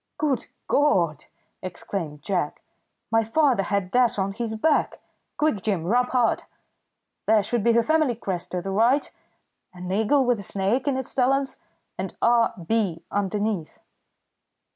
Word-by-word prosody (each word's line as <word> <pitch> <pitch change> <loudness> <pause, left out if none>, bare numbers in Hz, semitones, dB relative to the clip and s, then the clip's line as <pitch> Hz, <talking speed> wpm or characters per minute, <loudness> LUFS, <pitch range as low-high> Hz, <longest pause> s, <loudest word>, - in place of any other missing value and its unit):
"Good 285 -5 0 0.2
God!" 175 - +2 0.4
exclaimed 170 -4 -5
Jack. 175 -6 -2 0.5
"My 225 0 +3
father 250 -1 +2
had 195 -1 -2
that 245 -1 +3
on 195 0 0
his 220 +1 -3
back. 295 +8 +1 0.4
Quick, 300 -10 +1
Jim, 190 -5 -1
rub 245 +8 +2
hard! 245 -3 +1 0.8
There 215 -1 +4
should 235 +3 0
be 235 +3 +3
the 230 0 +3
family 310 -2 +2
crest 190 -6 -4
to 180 -1 -2
the 195 - -3
right 235 +8 +2 0.6
an 180 0 -6
eagle 220 +7 +2
with 245 -3 +2
a - - -5
snake 200 +8 -1
in 275 -2 +1
its 265 - 0
talons 270 +1 +1 0.4
and - - -4
R. 235 -1 +3
B. 195 -5 0
underneath." 205 -3 -2
220 Hz, 145 wpm, -24 LUFS, 190-250 Hz, 0.8 s, There